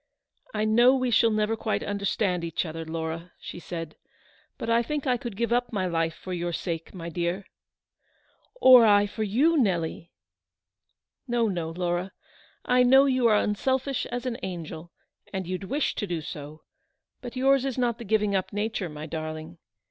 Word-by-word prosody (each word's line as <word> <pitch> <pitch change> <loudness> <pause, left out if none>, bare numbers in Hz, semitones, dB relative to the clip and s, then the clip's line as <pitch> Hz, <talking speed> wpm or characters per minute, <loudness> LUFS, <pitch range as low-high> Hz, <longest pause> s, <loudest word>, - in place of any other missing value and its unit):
" - - -47
I 215 0 +1
know 240 +4 +5
we 255 -2 0
shall 230 +1 +5
never 215 0 +1
quite 220 -1 -2
understand 200 -3 -1
each 165 +1 -2
other, 165 0 -5
Laura," 160 +1 -5
she - - -8
said; 165 -3 -7 0.3
" - - -33
but - - -5
I 230 0 +3
think 295 +4 -3
I 255 -2 +3
could 235 -4 -6
give 235 +1 0
up 245 -1 0
my 195 -4 -1
life 165 -2 0
for 185 - -7
your 175 0 -2
sake, 165 -1 -4
my 170 -2 -6
dear." 175 +3 -2 0.6
" - - -39
Or 255 - +8
I 205 -2 +5
for 210 +2 -6
you, 255 +11 +3
Nelly." 170 - 0 0.6
" 95 - -55
No, 240 -2 +1
no, 175 -5 -2
Laura. 175 +2 -2 0.5
I 250 0 +4
know 265 +2 +6
you 255 -3 +3
are 215 -2 +5
unselfish 260 +6 0
as 245 +1 -4
an 245 -2 -2
angel, 170 -3 -6 0.4
and 190 -1 -3
you'd 185 +2 -4
wish 280 +9 0
to 205 - -3
do 170 -3 -2
so; 150 0 -8 0.6
but 245 0 -8
yours 270 +1 +3
is 270 -2 -2
not 240 -2 0
the - - -6
giving 210 -1 +1
up 190 - -1
nature, 205 -3 -2
my 150 0 -7
darling. 155 +1 -6
200 Hz, 185 wpm, -26 LUFS, 170-240 Hz, 0.6 s, Or